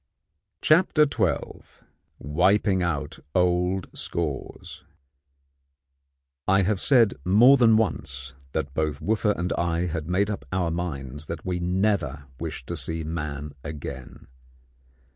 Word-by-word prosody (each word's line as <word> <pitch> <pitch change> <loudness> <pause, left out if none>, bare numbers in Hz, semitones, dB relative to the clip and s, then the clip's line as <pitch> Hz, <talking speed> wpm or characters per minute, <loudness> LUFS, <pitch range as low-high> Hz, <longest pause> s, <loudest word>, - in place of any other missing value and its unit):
CHAPTER 155 -1 +5
XII 110 - -1 0.6
WIPING 95 +6 +2
OUT 75 -4 -2 0.2
OLD 90 +1 +2
SCORES 75 -6 -4 1.6
I 95 +1 +4
have 100 0 0
said 120 -7 +5
more 115 - +7
than 115 -4 +5
once 70 -11 -2 0.2
that 70 0 -2
both 75 -1 -1
Wooffa 105 -1 +1
and 90 +1 -1
I 85 0 0
had 80 -2 -3
made 100 +3 +1
up 105 - -5
our 90 -3 0
minds 75 -4 -5
that 80 -1 -6
we 90 -1 -1
never 90 -6 0
wished 65 - -5
to - - -4
see 80 0 -3
man 75 -2 -4
again. 70 -5 -8
90 Hz, 120 wpm, -25 LUFS, 75-100 Hz, 1.6 s, more